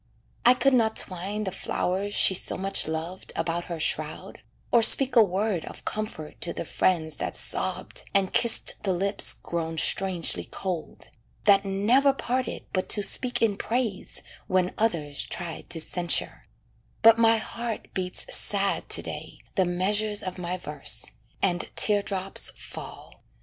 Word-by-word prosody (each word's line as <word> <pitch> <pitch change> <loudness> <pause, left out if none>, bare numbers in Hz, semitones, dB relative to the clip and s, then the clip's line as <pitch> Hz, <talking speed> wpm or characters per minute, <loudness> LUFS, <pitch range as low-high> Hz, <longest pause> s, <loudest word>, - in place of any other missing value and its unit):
I 245 +1 +7
could 275 +2 +2
not 225 -3 +3
twine 195 +3 -2
The 190 - -3
flowers 195 +2 -2
she - - +5
so 185 - 0
much 195 -2 -2
loved 160 +4 -4
about 170 +1 -2
her 170 -2 -6
shroud, - - -1 0.3
Or 235 - +5
speak 260 +3 +7
a 235 - +8
word 195 -2 0
of - - -11
comfort 210 -8 -5
to 170 - -3
the - - -5
friends 160 -4 0
That - - -4
sobbed, - - 0
and 195 -1 +1
kissed 235 -1 +2
the 195 -3 0
lips 195 +3 +1
grown 165 -1 -4
strangely 185 +1 +1
cold, 180 -4 -5 0.3
That 200 -1 +5
never 230 +9 +3
parted 255 -1 -2
but 185 - -1
to 205 - +4
speak 245 +5 +2
in 205 -3 +2
praise 225 -4 -3 0.2
When 185 -1 +1
others 165 -10 -1
tried 170 -2 -6
to 165 - 0
censure; 175 +2 0 0.6
but 225 0 +7
my 225 0 +5
heart 230 0 -4
Beats 180 -1 -1
sad 200 -1 0
to - - +4
day - - -7 0.2
the 190 -4 +2
measures 205 +4 0
of 185 0 -5
my 180 +1 -3
verse, 145 -9 0 0.3
And 175 -3 +1
tear 205 -1 +2
drops 195 -1 -3
fall. - - -10
195 Hz, 155 wpm, -26 LUFS, 175-220 Hz, 0.6 s, a